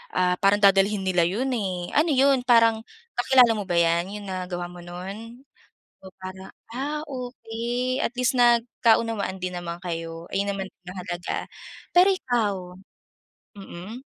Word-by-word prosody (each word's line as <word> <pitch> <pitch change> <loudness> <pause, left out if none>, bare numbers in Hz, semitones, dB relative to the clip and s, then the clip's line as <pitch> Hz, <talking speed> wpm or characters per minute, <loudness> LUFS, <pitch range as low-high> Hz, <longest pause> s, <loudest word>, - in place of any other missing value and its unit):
ah, 180 0 +2
parang 200 +1 +4
dadalhin 195 0 +4
nila 180 -2 +2
'yun, 220 +9 -1
eh. 185 -5 -3
Ano 310 +2 +3
'yun, 270 -1 +4
parang 230 -2 +4 0.4
kakilala 250 -1 +6
mo 210 - -3
ba 175 - -1
'yan, 170 0 +3 0.2
'yung 205 - -10
nagawa 180 -1 -4
mo 180 - -11
no'n 200 +8 -8 0.6
o 190 - -11
para 190 0 -9 0.2
ah, 290 +4 -3
okey 250 -1 -3
at - - -1
least 250 +2 +2
nagkaunawaan 230 -4 +2
din 180 0 -3
naman 170 -1 -5
kayo, 165 -1 -5
ayun 200 +1 0
naman 195 -1 -4
ang 180 -1 -15
mahalaga. 175 -1 -4 0.5
Pero 360 +2 +6
ikaw? 245 - +1 1.0
Mm. 195 +4 -9
205 Hz, 145 wpm, -25 LUFS, 180-245 Hz, 1.0 s, kakilala